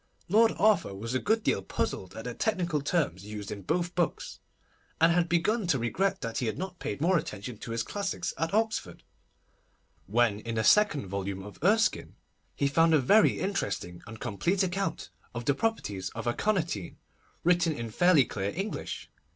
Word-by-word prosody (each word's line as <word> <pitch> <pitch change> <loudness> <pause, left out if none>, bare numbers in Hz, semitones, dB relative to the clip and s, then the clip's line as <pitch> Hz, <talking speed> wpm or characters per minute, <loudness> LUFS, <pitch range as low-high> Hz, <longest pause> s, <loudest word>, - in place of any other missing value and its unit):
Lord 225 +4 +5
Arthur 205 - +3
was 115 +5 -5
a 130 - +1
good 220 - +1
deal - - +1
puzzled - - -3
at - - -6
the - - -4
technical 175 -8 0
terms 140 - 0
used 105 -1 -7
in 100 - -5
both 175 - -1
books, 175 -4 -2 0.6
and 165 +1 +5
had 170 0 +2
begun 185 +5 +1
to 150 - +3
regret 190 +11 0
that 115 -3 -3
he 125 - -1
had 110 - -2
not 185 -1 -5
paid 105 - -4
more 175 +2 +4
attention 110 -3 -7
to - - -8
his 115 0 -1
classics 200 - -3
at 165 +1 -2
Oxford, 220 - -1 1.0
when 110 -1 +2
in 115 +1 -5
the 110 - +1
second 200 - +4
volume 95 0 -4
of 105 0 -11
Erskine, 215 +3 +2 0.4
he 140 - +1
found 165 +3 +4
a - - +5
very 205 - +4
interesting 100 - -3
and 110 +1 -9
complete 175 - 0
account 190 -1 -2 0.2
of 120 0 -4
the 140 - +3
properties 105 - -2
of 115 - -5
aconitine, 160 - -1 0.5
written 175 -1 +3
in 115 -6 -5
fairly 170 0 +5
clear 100 -2 -3
English. 195 +4 -4
160 Hz, 175 wpm, -29 LUFS, -, 1.0 s, Lord